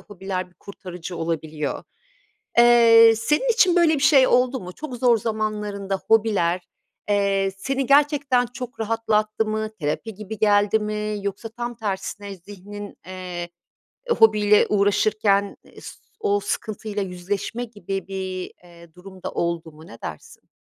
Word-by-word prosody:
hobiler 190 -2 -5
bir - - -30
kurtarıcı 180 -2 -9
olabiliyor. 160 -3 -3 0.8
Eee, 230 -1 +7
senin 300 - +1
için 370 -6 +4
böyle 335 -2 +5
bir 290 - -1
şey 270 -2 +6
oldu 255 +1 +2
mu? 180 0 -8
Çok 280 +3 -7
zor 240 -1 +3
zamanlarında 210 -3 -3
hobiler, 200 -6 +2 0.5
eee, 200 -1 +1
seni 270 +5 -2
gerçekten 280 -3 +3
çok 245 0 -9
rahatlattı 220 -1 0
mı? 215 0 -2
Terapi 155 +9 -3
gibi 215 +2 -8
geldi 205 0 +3
mi? 210 0 -3
Yoksa 200 +3 -4
tam 240 +1 -5
tersine 200 -1 -4
zihnin, 205 +2 -10
eee, 180 -2 -6 0.6
hobiyle 210 - +5
uğraşırken 205 0 +2
es - - -12 0.2
o 410 -2 +1
sıkıntıyla 210 - -4
yüzleşme 195 +5 -4
gibi 195 -5 -6
bir, 190 -1 -5
eee, 170 -2 -17
durumda 185 0 -9
oldu 170 -2 -2
mu? 155 +2 -15
Ne 115 - -12
dersin? 80 - -9
205 Hz, 130 wpm, -23 LUFS, 185-230 Hz, 0.8 s, Eee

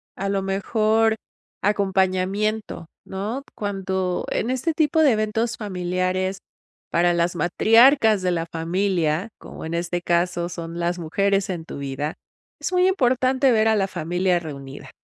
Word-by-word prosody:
a 195 - -3
lo 195 -1 0
mejor, 215 +3 +1 0.5
acompañamiento, 195 0 0 0.2
¿no? 210 +8 -4
Cuando, 190 -3 -2
en 235 - -1
este 260 +6 0
tipo 315 0 +2
de 290 -5 +6
eventos 220 +2 -1
familiares, 185 -1 -2 0.5
para 175 +1 +3
las 170 +1 0
matriarcas 225 - +5
de 180 -1 +1
la 165 -1 -1
familia, 170 +1 -1
como - - -9
en 160 - -5
este 175 +1 -2
caso, 175 0 0
son 170 -1 -6
las 175 +1 -1
mujeres 195 +4 0
en 170 -3 -4
tu - - -8
vida. 140 +2 -3 0.5
Es - - -2
muy 365 0 +3
importante 260 -5 +2
ver 220 -1 +3
a 220 - +4
la 195 -2 +1
familia 175 +1 0
reunida. 140 -3 -9
190 Hz, 145 wpm, -23 LUFS, 175-220 Hz, 0.5 s, de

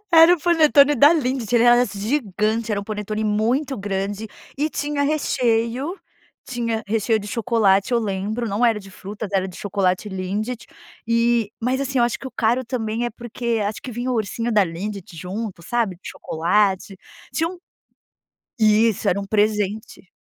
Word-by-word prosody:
Era 330 +2 +8
um - - -7
panetone 295 -4 +5
da 290 +6 +7
Lindt, 255 -7 -1
ele 235 - +5
era 240 0 +6
assim 200 -5 -4
gigante, 220 -2 -1
era 200 - 0
um - - -9
panetone 215 0 -4
muito 235 +7 0
grande 200 +2 -3 0.3
e 305 +2 +1
tinha 290 -1 -2
recheio 260 - 0 0.5
tinha 230 -3 -2
recheio 220 +1 +1
de 205 - -8
chocolate, 220 -2 +2
eu 235 - +3
lembro, 215 +3 -2
não 215 +5 +2
era 220 -2 +1
de 195 0 -13
frutas, 205 +2 -7
era 190 -1 +1
de 185 - -10
chocolate 195 0 -1
Lindt, 205 +5 -4 0.4
e 230 -2 +2
mas 255 +3 0
assim, 270 -1 -1
eu 240 - +5
acho 240 - -1
que - - -8
o 260 - -8
caro 240 +2 +1
também 230 -1 -2
é 240 - -1
porque 235 0 -3
acho 210 +1 -3
que 250 - -7
vinha 245 +3 -3
o - - 0
ursinho 230 +2 -2
da 210 -3 +4
Lindt 180 +1 -6
junto, 185 +1 -5
sabe, 230 -1 -1
de - - -8
chocolate, 190 +3 0 0.4
tinha 325 +1 0
um 365 - -8 1.0
Isso, 215 -1 +3
era 200 +3 0
um 200 - -6
presente. 210 -2 -1
220 Hz, 175 wpm, -22 LUFS, 205-245 Hz, 1.0 s, Era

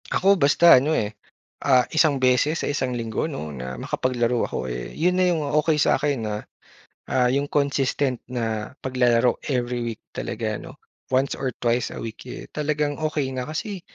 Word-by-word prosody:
Ako 195 +2 +4
basta 145 -1 +7
ano, 155 +3 +1
eh, 105 0 -1 0.5
ah, 130 -3 +4
isang 155 -3 +4
beses 130 +5 +2
sa - - -2
isang 130 -3 -1
linggo 115 +6 -2
'no, 80 - -6
na 65 -1 -6
makapaglaro 120 - 0
ako, 65 - -3
eh, - - -5
'yun 180 +3 +2
na 185 - +4
'yung 165 -3 +1 0.2
okey 155 0 +1
sa'kin 140 -4 +1
na, 105 -1 -2 0.7
ah, 125 -1 +3
'yung 140 +1 0
consistent 140 -2 0
na 115 -1 -3
paglalaro 125 -2 +2
every 125 -2 -1
week 115 -2 -4
talaga - - -3
ano, - - -11 0.3
once 130 +1 +1
or 135 - -2
twice 120 +1 0
a - - -8
week, 115 -1 -7
eh, - - -7
talagang 150 -1 -1
okey 150 -4 -1
na. 130 +2 -4
Kasi, 185 +5 -4
130 Hz, 170 wpm, -24 LUFS, 120-150 Hz, 0.7 s, basta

